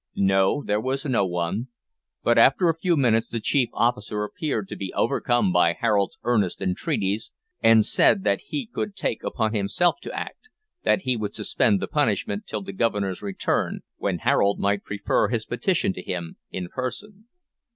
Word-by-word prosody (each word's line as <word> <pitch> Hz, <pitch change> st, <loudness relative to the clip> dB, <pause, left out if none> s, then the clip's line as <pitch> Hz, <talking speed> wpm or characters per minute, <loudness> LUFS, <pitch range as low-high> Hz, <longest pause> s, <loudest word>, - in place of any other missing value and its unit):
No, 95 Hz, +7 st, +2 dB
there 105 Hz, +1 st, 0 dB
was 135 Hz, +3 st, -2 dB
no 115 Hz, -8 st, +1 dB
one; 90 Hz, +7 st, -2 dB, 0.6 s
but 120 Hz, -, +3 dB
after 135 Hz, +9 st, +5 dB
a 165 Hz, -, +2 dB
few 170 Hz, 0 st, +1 dB
minutes 115 Hz, -4 st, +3 dB
the 115 Hz, -, -3 dB
chief 125 Hz, +2 st, +1 dB
officer 105 Hz, -3 st, 0 dB
appeared 110 Hz, -2 st, -3 dB
to -, -, -5 dB
be 95 Hz, -1 st, -5 dB
overcome 120 Hz, -6 st, +1 dB
by 85 Hz, -1 st, +4 dB
Harold's 100 Hz, +2 st, 0 dB
earnest 105 Hz, -7 st, +1 dB
entreaties, 95 Hz, +3 st, -1 dB, 0.3 s
and 110 Hz, -1 st, +6 dB
said 195 Hz, -, +4 dB
that -, -, +1 dB
he 280 Hz, -4 st, -3 dB
could 215 Hz, -2 st, -4 dB
take 150 Hz, -11 st, -2 dB
upon 110 Hz, -1 st, -1 dB
himself 110 Hz, -, +1 dB
to -, -, -7 dB
act, 440 Hz, -, -8 dB, 0.3 s
that -, -, +3 dB
he 130 Hz, -, +1 dB
would 105 Hz, -2 st, -4 dB
suspend 105 Hz, -1 st, +1 dB
the -, -, -3 dB
punishment 105 Hz, -7 st, 0 dB
till 105 Hz, -2 st, -4 dB
the 100 Hz, -, -7 dB
Governor's 100 Hz, -3 st, -1 dB
return, 100 Hz, -2 st, -1 dB, 0.2 s
when -, -, -1 dB
Harold 100 Hz, 0 st, +2 dB
might 100 Hz, 0 st, 0 dB
prefer 105 Hz, +1 st, 0 dB
his 110 Hz, 0 st, -2 dB
petition 125 Hz, -, 0 dB
to 90 Hz, -, -7 dB
him 85 Hz, -2 st, -5 dB
in 90 Hz, -1 st, -5 dB
person. 200 Hz, -, -6 dB
110 Hz, 170 wpm, -24 LUFS, 100-130 Hz, 0.6 s, and